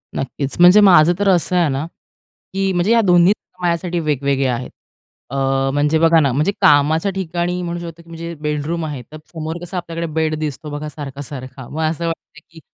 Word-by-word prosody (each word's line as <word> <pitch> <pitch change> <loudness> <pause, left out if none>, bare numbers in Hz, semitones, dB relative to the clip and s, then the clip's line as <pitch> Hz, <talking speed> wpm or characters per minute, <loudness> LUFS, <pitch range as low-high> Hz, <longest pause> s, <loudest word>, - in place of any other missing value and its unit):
नक्कीच. 135 +1 -3
म्हणजे 180 +4 +8
माझं 175 -4 +6
तर 205 - +1
असं 180 0 +2
आहे 170 -4 +3
ना, 135 +3 -2 0.7
की 195 0 0
म्हणजे 175 +5 +1
या 230 0 +5
दोन्ही 180 -1 +5 0.3
माझ्यासाठी 175 0 -1
वेगवेगळ्या 140 -4 0
आहेत. 125 - -6 0.6
अ, 130 - -6 0.4
म्हणजे 150 +2 +2
बघा 165 0 +5
ना, 140 -3 +2
म्हणजे 150 +9 +1
कामाच्या 155 +5 +4
ठिकाणी 180 -1 -2
म्हणू 175 -1 -4
शकतो, 170 -1 -9
की - - -26
म्हणजे 165 0 -7
बेडरूम 150 +2 -2
आहे. 145 -4 -5
तर 155 - -8 0.2
समोर 160 0 -5
कसा 180 +2 -6
आपल्याकडे 170 -1 -4
बेड 160 0 0
दिसतो 155 0 -5
बघा 150 +1 -5
सारखा-सारखा. 135 -3 -8
मग 155 - -4
असं 160 +2 -1
वाटतं, 165 -1 -7
की 165 0 -15
160 Hz, 185 wpm, -19 LUFS, 145-175 Hz, 0.7 s, म्हणजे